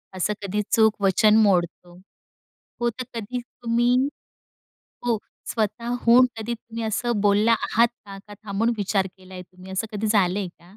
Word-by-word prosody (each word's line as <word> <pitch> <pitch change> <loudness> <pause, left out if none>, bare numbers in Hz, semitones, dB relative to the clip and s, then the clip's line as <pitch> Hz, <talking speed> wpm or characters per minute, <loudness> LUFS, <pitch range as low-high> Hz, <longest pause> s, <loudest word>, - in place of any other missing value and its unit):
असं 185 +3 0
कधी 200 +1 -2
चूक 220 -1 +3
वचन 200 +2 +4
मोडतो. 175 -3 0 0.9
हो, 240 - +2
तर 255 +3 -6
कधी 235 +2 -4
तुम्ही 240 0 0 1.1
हो, 235 -2 +2 0.3
स्वतःहून 235 +2 +3
कधी 225 +2 -3
तुम्ही 230 0 -7
असं 220 +1 -1
बोलला 205 +2 +3
आहात 230 +1 +2 0.2
का? 195 -1 -9
का 205 - -10
थांबून 210 +3 0
विचार 195 -1 0
केलाय 185 0 -10
तुम्ही, 185 +1 -14
असं 205 +4 -2
कधी 215 +1 -2
झालंय 200 -2 +2
का? 170 - -18
215 Hz, 145 wpm, -24 LUFS, 195-230 Hz, 1.1 s, वचन